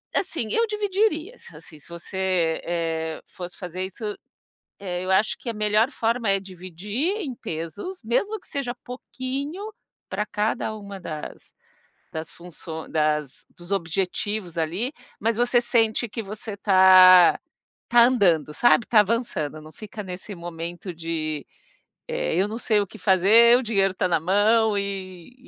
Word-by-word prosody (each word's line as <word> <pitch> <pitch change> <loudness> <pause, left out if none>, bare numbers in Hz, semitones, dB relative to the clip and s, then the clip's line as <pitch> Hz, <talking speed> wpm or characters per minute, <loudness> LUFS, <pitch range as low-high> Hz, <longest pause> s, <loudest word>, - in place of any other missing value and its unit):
assim, 325 - -1
eu 460 - +3
dividiria, 415 -1 0
as 175 - -16
assim, 155 0 -13
se 150 - -16
você, 170 -1 -1
eh 165 -2 -2
eh, - - -21
fosse 180 -1 -9
fazer 180 0 -5
isso, 190 +4 -10 0.8
eh, 180 -2 -4
eu 185 - -3
acho 190 +3 +2
que 240 - -5
a - - -5
melhor 215 +3 +2
forma 230 -3 -1
é 195 0 +2
dividir 190 - -4
em 270 -9 -4
pesos, 185 - -6
mesmo 400 - 0
que - - -15
seja 260 -3 -3
pouquinho 265 +7 -5 0.5
pra 210 - -2
cada 215 +1 -1
uma 200 -2 -8
das 155 -4 -8 0.6
das 160 0 -5
funço 165 -2 -9
das 150 -3 -1
dos 175 +2 -12
objetivos 185 +1 -2
ali, 180 - -2 0.3
mas 225 +1 0
você 240 0 +3
sente 235 -1 +2
que 225 +1 -5
você 210 +1 -6
tá 185 -2 +7 0.5
tá 240 0 +6
andando, 180 -12 +2
sabe, 240 +4 +4
tá 220 -3 +6
avançando, 195 - -2
não 155 +1 -13
fica 215 0 -8
nesse 185 +2 -7
momento 170 +1 -7
de, 155 -3 -4 0.6
eh: - - -2
"Eu 190 +3 +2
não 225 +3 -5
sei 215 -3 +2
o 200 - -1
que 220 - -13
fazer", 220 +5 +6
o 260 - -2
dinheiro 195 -4 +1
tá 185 - +1
na 170 -2 +2
mão 205 +5 +3
e 195 0 -5
200 Hz, 155 wpm, -24 LUFS, 175-235 Hz, 0.8 s, tá